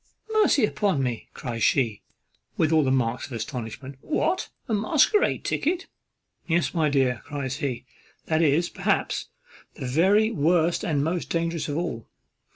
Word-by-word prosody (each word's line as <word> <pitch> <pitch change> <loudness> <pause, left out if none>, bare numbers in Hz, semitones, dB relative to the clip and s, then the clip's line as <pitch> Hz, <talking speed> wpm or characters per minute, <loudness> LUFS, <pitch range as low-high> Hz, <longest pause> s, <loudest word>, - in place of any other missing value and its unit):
"Mercy 400 - +4
upon 195 -9 0
me!" 120 -3 -3
cries 120 -4 -5
she, 115 -7 +2 0.6
with 160 -1 +2
all 160 -1 +4
the 135 - +1
marks 125 -2 0
of 135 - -10
astonishment; 125 +3 -6
"what! 355 +4 -1 0.2
a 230 - -1
masquerade 310 - +2
ticket!" 350 +5 0 0.6
"Yes, 170 0 +1
my 160 -3 +2
dear," 130 -4 +1
cries 140 -2 -4
he; 130 -6 -3 0.4
"that 160 0 +1
is, 160 +2 +3
perhaps, - - -1 0.5
the 135 - -6
very 195 - +3
worst 170 -1 +2
and 145 -4 0
most 170 +3 -2
dangerous 165 -2 -1
of 145 - -2
all. 160 -10 -3
155 Hz, 150 wpm, -25 LUFS, 130-180 Hz, 0.6 s, Mercy